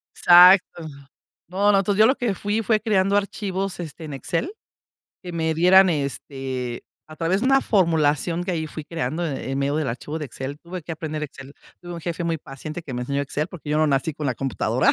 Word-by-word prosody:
Exacto. 175 Hz, -1 st, +6 dB, 0.6 s
No, 200 Hz, +3 st, +2 dB
no. 195 Hz, -, +4 dB
Entonces 200 Hz, +1 st, 0 dB
yo 220 Hz, -, +8 dB
lo 260 Hz, -, +4 dB
que 230 Hz, -5 st, -1 dB
fui 210 Hz, +4 st, -2 dB
fue 215 Hz, 0 st, +2 dB
creando 200 Hz, -3 st, +2 dB
archivos, 195 Hz, -2 st, -2 dB
este, 160 Hz, -1 st, -8 dB
en 150 Hz, -3 st, -6 dB
Excel, 170 Hz, -, -3 dB, 0.7 s
que 180 Hz, -2 st, -7 dB
me 160 Hz, -1 st, -1 dB
dieran, 185 Hz, +3 st, +6 dB
este, 135 Hz, -4 st, -4 dB, 0.3 s
a 155 Hz, -, -11 dB
través 175 Hz, +5 st, 0 dB
de 260 Hz, -, 0 dB
una 270 Hz, 0 st, +5 dB
formulación 165 Hz, -, +1 dB
que 185 Hz, -, -2 dB
ahí 160 Hz, -2 st, -2 dB
fui 155 Hz, 0 st, -8 dB
creando, 160 Hz, +2 st, -3 dB
en 135 Hz, -2 st, -4 dB
medio 140 Hz, +2 st, 0 dB
del 155 Hz, -5 st, -1 dB
archivo 145 Hz, +6 st, -5 dB
de 150 Hz, -, -4 dB
Excel 135 Hz, +2 st, -6 dB
tuve 175 Hz, 0 st, -7 dB
que 165 Hz, -, -6 dB
aprender 155 Hz, -1 st, -5 dB
Excel, 140 Hz, -2 st, -8 dB, 0.3 s
tuve 175 Hz, 0 st, -8 dB
un 170 Hz, -, -7 dB
jefe 170 Hz, +1 st, -4 dB
muy 165 Hz, -2 st, -1 dB
paciente 150 Hz, +4 st, -8 dB
que 130 Hz, -5 st, -7 dB
me 125 Hz, -, -3 dB
enseñó 140 Hz, +3 st, -2 dB
Excel, 145 Hz, +3 st, -3 dB
porque 160 Hz, -4 st, -10 dB
yo 150 Hz, -, +1 dB
no 155 Hz, -, +3 dB
nací 145 Hz, +2 st, 0 dB
con 150 Hz, -, -6 dB
la 125 Hz, -, 0 dB
computadora. 135 Hz, +2 st, +1 dB
165 Hz, 215 wpm, -23 LUFS, 145-185 Hz, 0.7 s, yo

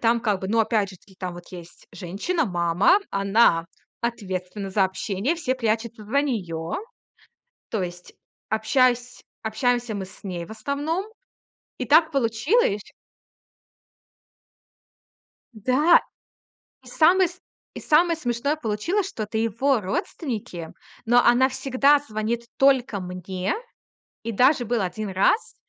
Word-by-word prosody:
там 235 Hz, 0 st, +3 dB
как 205 Hz, -4 st, 0 dB
бы, 190 Hz, -, -4 dB
ну, 225 Hz, +3 st, +1 dB
опять 215 Hz, -3 st, +2 dB
же 190 Hz, -, -12 dB
таки, 190 Hz, +2 st, -22 dB
там 185 Hz, -1 st, -5 dB
вот 175 Hz, 0 st, -10 dB
есть 175 Hz, -1 st, -12 dB
женщина, 210 Hz, -, -2 dB
мама, 175 Hz, -, +3 dB
она 195 Hz, -4 st, +3 dB, 0.3 s
ответственна 195 Hz, -4 st, -4 dB
за 195 Hz, 0 st, +3 dB
общение, 200 Hz, -, -2 dB
все 275 Hz, -6 st, -1 dB
прячутся 225 Hz, -2 st, -2 dB
за 255 Hz, +7 st, +1 dB
неё. 175 Hz, -, -3 dB, 1.0 s
То 215 Hz, -4 st, -1 dB
есть, 175 Hz, 0 st, -7 dB, 0.4 s
общайсь 245 Hz, +3 st, +1 dB, 0.2 s
общаемся 240 Hz, +1 st, 0 dB
мы 200 Hz, -2 st, -3 dB
с 190 Hz, -, -15 dB
ней 180 Hz, -4 st, -5 dB
в -, -, -15 dB
основном. 285 Hz, -, -2 dB, 0.7 s
И 255 Hz, -, -3 dB
так 315 Hz, +4 st, +5 dB
получилось 240 Hz, -, +1 dB, 2.7 s
Да. 260 Hz, -, +4 dB, 0.8 s
И -, -, -16 dB
самое 360 Hz, +4 st, +4 dB
с 360 Hz, +1 st, -15 dB, 0.4 s
и -, -, -6 dB
самое 335 Hz, +2 st, +4 dB
смешное 270 Hz, 0 st, -1 dB
получилось, 310 Hz, -, -1 dB
что 235 Hz, -, -5 dB
это 215 Hz, +1 st, -4 dB
его 230 Hz, +3 st, +1 dB
родственники, 195 Hz, -, -4 dB, 0.3 s
но 240 Hz, +2 st, +5 dB
она 250 Hz, +2 st, +5 dB
всегда 275 Hz, +2 st, +3 dB
звонит 230 Hz, -3 st, -3 dB
только 260 Hz, -7 st, +3 dB
мне. 180 Hz, +1 st, -3 dB, 0.7 s
И 230 Hz, -, -3 dB
даже 255 Hz, +4 st, +4 dB
был 235 Hz, 0 st, 0 dB
1 205 Hz, +3 st, -3 dB
раз, 190 Hz, -, +1 dB
225 Hz, 130 wpm, -24 LUFS, 195-270 Hz, 2.7 s, так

